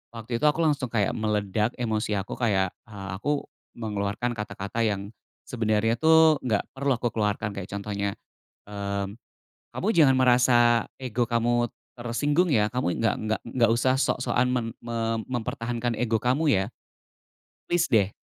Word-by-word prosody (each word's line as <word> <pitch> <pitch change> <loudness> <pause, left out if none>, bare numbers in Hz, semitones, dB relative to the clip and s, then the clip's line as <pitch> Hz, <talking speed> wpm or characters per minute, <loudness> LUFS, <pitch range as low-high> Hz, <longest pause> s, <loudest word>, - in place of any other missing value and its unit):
waktu 115 +1 -5
itu - - +2
aku 150 +2 +2
langsung 145 -4 +1
kayak 105 -4 +1
meledak 105 +1 0
emosi 110 -3 -1
aku, 95 - -5
kayak, 95 -5 +1 0.2
eee, 100 -3 -8
aku 145 +5 -1 0.3
mengeluarkan 105 +2 -2
kata-kata 105 +1 -3
yang 100 -2 -1 0.4
sebenarnya 115 -1 +1
tuh 160 -1 +6
nggak 110 -5 +1
perlu 140 +1 0
aku 120 - -1
keluarkan, 105 -1 0
kayak 100 -1 -6
contohnya, 100 0 -2 0.6
mmm, 100 -1 -4 0.6
"Kamu 195 - -2
jangan 145 -5 +6
merasa 120 -2 +4 0.2
ego 120 -1 -1
kamu 120 0 +1 0.3
tersinggung 145 +9 +1
ya, 105 -3 +3
kamu 125 -9 -1
nggak 115 - +2
nggak 110 0 -1
nggak 115 -3 +2
usah 130 +2 +2
sok-sokan 125 -2 +1
mem 120 -3 0
mem 115 -1 -2
mempertahankan 120 -1 -2
ego 115 -2 +1
kamu, 140 +4 +2
ya. 95 -1 +2 1.0
Plis 175 0 +3
deh, 100 -4 +4
115 Hz, 145 wpm, -26 LUFS, 105-125 Hz, 1.0 s, tuh